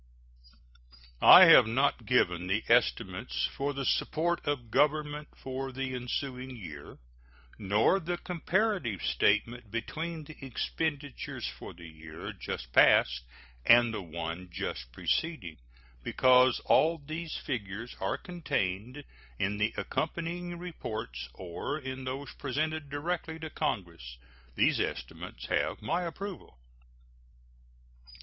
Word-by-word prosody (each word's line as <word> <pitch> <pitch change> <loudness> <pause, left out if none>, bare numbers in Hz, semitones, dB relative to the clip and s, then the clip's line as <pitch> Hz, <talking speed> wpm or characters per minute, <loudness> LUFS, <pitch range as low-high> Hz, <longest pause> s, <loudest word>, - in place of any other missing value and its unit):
I 185 - +11
have 155 -9 +9
not 135 +5 +1
given 90 -8 +2
the 105 +4 0
estimates 110 -3 +1
for 140 +1 -1
the 135 -1 -4
support 170 +6 0
of 125 -6 -2
Government 150 +1 +1
for 135 0 -5
the 130 0 -3
ensuing 125 +1 -4
year, 75 -10 -9 0.6
nor 105 - +3
the 175 0 -3
comparative 175 - -1
statement 110 - +1
between 160 +9 -4
the 150 -1 -12
expenditures 145 - -3
for 60 +5 -9
the 85 -1 -11
year 80 0 -9
just - - -6
passed 60 -1 +5 0.4
and 120 - +6
the 105 - -3
one 85 +1 -6
just 65 -7 -5
preceding, 90 - -2 0.5
because 130 - +5
all 165 +2 +4
these 155 +2 -5
figures 115 -3 -5
are 95 - -1
contained 130 - -3 0.3
in 105 +6 -1
the 105 +2 +2
accompanying 170 +2 -3
reports 110 - -6
or 95 - -4
in 130 -2 -6
those 135 +2 -5
presented 155 +2 -2
directly 160 +2 -3
to 160 -1 -7
Congress. 80 -10 -3 0.4
These - - +3
estimates - - -4
have - - 0
my 170 +11 0
approval. 180 - -7
130 Hz, 115 wpm, -30 LUFS, 95-155 Hz, 0.6 s, I